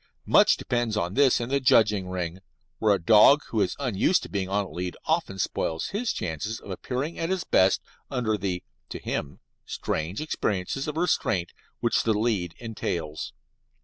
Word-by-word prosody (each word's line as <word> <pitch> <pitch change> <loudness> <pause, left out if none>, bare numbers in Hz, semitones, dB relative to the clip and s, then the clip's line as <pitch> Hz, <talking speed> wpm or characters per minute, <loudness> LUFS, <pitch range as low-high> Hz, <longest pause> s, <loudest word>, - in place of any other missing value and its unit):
Much - - +5
depends 120 -3 -1
on 90 -2 -1
this 135 0 +4
in 120 0 -3
the 140 +1 +2
judging 105 -8 +3
ring, 90 -1 -3 0.4
where 105 -2 +4
a - - -3
dog 110 - +6
who 110 - 0
is 95 - 0
unused 135 - +1
to - - -8
being 95 -2 -2
on 100 +1 0
a - - -11
lead 90 0 -4
often 160 - 0
spoils 80 -3 -2
his 225 +4 -1
chances 90 +7 -3
of 100 - -10
appearing 130 - -4
at 165 - -1
his 190 -2 0
best 95 +1 +3 0.3
under 120 -5 0
the 95 -3 -3 0.3
(to - - -5
him) 70 - -4 0.2
strange 80 +6 -3
experiences 135 -4 -2
of 150 +1 -4
restraint 105 - 0 0.3
which 120 - +2
the 110 -2 +1
lead 105 -7 0
entails. 85 -9 -4
105 Hz, 175 wpm, -26 LUFS, 90-130 Hz, 0.4 s, dog